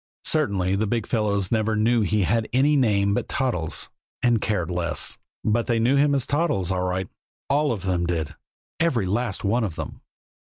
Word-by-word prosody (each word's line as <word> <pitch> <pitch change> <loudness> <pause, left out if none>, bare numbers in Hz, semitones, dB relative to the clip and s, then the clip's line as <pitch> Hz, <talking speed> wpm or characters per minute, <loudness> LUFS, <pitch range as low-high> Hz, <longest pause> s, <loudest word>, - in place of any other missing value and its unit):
Certainly 100 - +1
the 110 +1 0
big 115 +2 -1
fellows 100 -4 0
never 110 -1 +1
knew 115 +2 +2
he 105 0 +1
had 110 +5 0
any 140 +4 +4
name 100 -7 +2
but - - -2
Toddles 115 - -1 0.3
and 120 -3 +3
cared 90 -6 -1
less. 85 -3 -1 0.2
But 115 +2 +1
they 120 -3 +2
knew 120 +4 +3
him 140 0 +3
as 135 - 0
Toddles, 140 - 0
all 90 -1 0
right! 90 0 -2 0.4
All 145 0 +2
of 105 -5 -3
them 90 -2 0
did, 80 -3 -2 0.5
every 140 - +1
last 105 +2 -2
one 115 +4 +1
of 95 -7 -3
them! - - -7
110 Hz, 185 wpm, -24 LUFS, 95-120 Hz, 0.5 s, any